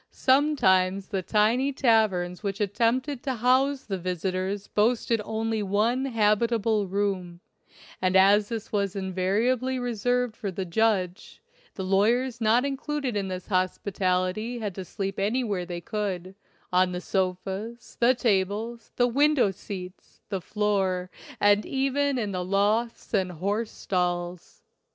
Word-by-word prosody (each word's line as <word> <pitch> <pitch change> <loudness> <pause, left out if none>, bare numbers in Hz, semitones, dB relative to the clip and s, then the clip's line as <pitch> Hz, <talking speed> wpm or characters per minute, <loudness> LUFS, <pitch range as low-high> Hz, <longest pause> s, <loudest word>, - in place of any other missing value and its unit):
Some 285 +4 +3
times 190 -3 +2
the 195 -3 -1
tiny 225 +8 +2
taverns 215 -9 +2
which 200 -2 -3
attempted 240 +6 0
to 265 -2 -2
house 260 +4 +2
the 195 -3 -4
visitors 185 +2 -2
boasted 225 +1 +1
only 220 0 -2
one 215 +6 +1
habitable 220 -2 +1
room, 185 -3 -2 0.6
and 185 0 +1
as 200 +2 +5
this 225 -2 -5
was 200 -2 -1
invariably 205 +8 0
reserved 245 0 -1
for 200 - -4
the 190 0 -4
judge, 190 0 0 0.4
the 190 - -4
lawyers 230 +6 +1
not 225 +4 +3
included 280 -2 -2
in 195 -2 -1
his 185 -1 -5
hospitality 185 +3 -1
had 210 -4 -4
to 190 0 -7
sleep 195 +1 -4
anywhere 205 -3 -1
they 175 -1 -5
could 190 -3 -4 0.2
— - - -33
on 180 0 +3
the 180 - -3
sofas, 190 +5 -3
the 245 +2 +4
tables, 220 +1 -1
the 245 - +3
window 275 -3 +3
seats, 185 -1 -9
the 195 -2 -2
floor, 190 -3 -1 0.3
and 205 0 +4
even 275 +1 0
in 215 -4 -2
the 180 -1 -2
lofts 210 +6 0
and 185 -3 +1
horse 205 +7 -2
stalls. 175 -1 -3
205 Hz, 135 wpm, -26 LUFS, 185-235 Hz, 0.6 s, as